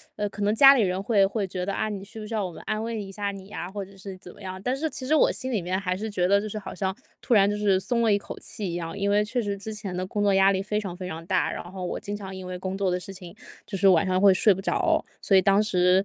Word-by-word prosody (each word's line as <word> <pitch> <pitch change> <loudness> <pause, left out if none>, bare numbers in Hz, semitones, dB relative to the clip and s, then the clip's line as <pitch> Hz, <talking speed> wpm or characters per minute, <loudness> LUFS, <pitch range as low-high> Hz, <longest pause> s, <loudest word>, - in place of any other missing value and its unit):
呃， 210 0 -1
可 205 - -8
能 205 +1 +2
家 275 +3 +9
里 265 - +3
人 185 -2 0
会 200 -1 +3
会 200 0 -2
觉 180 0 -4
得： 200 - -2
“啊， 215 - -1
你 200 -2 -5
需 215 +3 -11
不 215 - -6
需 220 - -7
要 215 -2 0
我 185 - -4
们 - - -11
安 215 0 -1
慰 225 -1 -3
一 195 -1 -8
下 205 +1 -3
你 195 -1 -10
呀？” 200 -4 -6
或 200 0 -5
者 195 +1 -17
是 195 0 -9
怎 180 -1 -12
么 205 - -17
样。 185 -1 -6
但 250 +3 0
是 315 +4 -2
其 260 - -6
实 290 - +1
我 310 - +5
心 260 0 -4
里 220 -6 0
面 180 +2 -1
还 185 -2 -1
是 215 +4 -4
觉 180 -4 0
得， 200 +1 +4
就 215 - -5
是 215 - -5
好 200 - -7
像 190 -1 -2 0.3
突 240 - +2
然 200 -1 +5
就 205 - -1
是 205 -2 +2
松 235 +4 0
了 225 -2 +3
一 200 - +4
口 200 - -8
气 210 - -5
一 - - -5
样， 165 +1 -5
因 200 0 0
为 205 +1 +4
确 235 +4 -2
实 205 -2 -2
之 200 +2 -7
前 200 -4 -5
的 185 +1 -2
工 205 +2 -1
作 200 -1 +3
压 195 0 +5
力 190 -1 0
非 210 +1 -1
常 195 -4 -5
非 185 -1 -6
常 165 -1 -6
大。 185 -1 +1
然 - - -5
后 185 -1 -5
我 - - -3
经 205 0 -4
常 190 -2 -8
因 185 -1 -7
为 180 0 -5
工 185 +1 -4
作 195 -1 0
的 180 0 0
事 195 +2 -8
情， 180 -2 -11 0.3
就 195 - -3
是 195 +1 +4
晚 180 -3 +5
上 185 0 +2
会 195 0 +7
睡 205 +3 +4
不 190 - 0
着。 325 - +1 0.2
所 195 - +4
以 - - +6
当 195 +2 +4
时 185 -2 +3
200 Hz, 365 characters per minute, -26 LUFS, 185-210 Hz, 0.3 s, 家